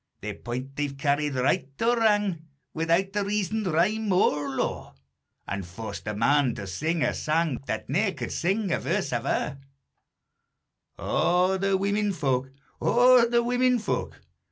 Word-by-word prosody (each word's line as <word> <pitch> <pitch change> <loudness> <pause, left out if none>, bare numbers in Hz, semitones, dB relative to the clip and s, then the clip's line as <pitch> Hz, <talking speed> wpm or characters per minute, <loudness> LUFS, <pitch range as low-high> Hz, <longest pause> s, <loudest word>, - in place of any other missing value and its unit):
Their - - -4
point 130 +3 -6
they've 145 -1 -2
carried 145 0 0
right 130 +1 +1
or 235 +1 +2
wrang, 205 -7 +1 0.3
Without 170 +5 0
a 205 - +2
reason, 210 +1 -1
rhyme, 195 +6 +1
or 150 -6 +2
law, 135 - -3 0.5
An' 100 0 -3
forced 95 +5 -8
a 105 - -2
man 135 +2 +2
to 100 - -6
sing 155 - -1
a - - +1
sang, 155 -3 0
That - - -3
ne'er 190 +7 +1
could - - -5
sing 195 +2 0
a - - +1
verse - - -1
ava. 135 - -1 1.4
_O 185 +2 +1
the 195 -1 +2
women 200 +1 0
fo'k! 135 -5 -1 0.3
O 245 0 +5
the 235 0 +3
women 250 +1 +2
fo'k! 225 - -3
170 Hz, 150 wpm, -26 LUFS, 140-210 Hz, 1.4 s, O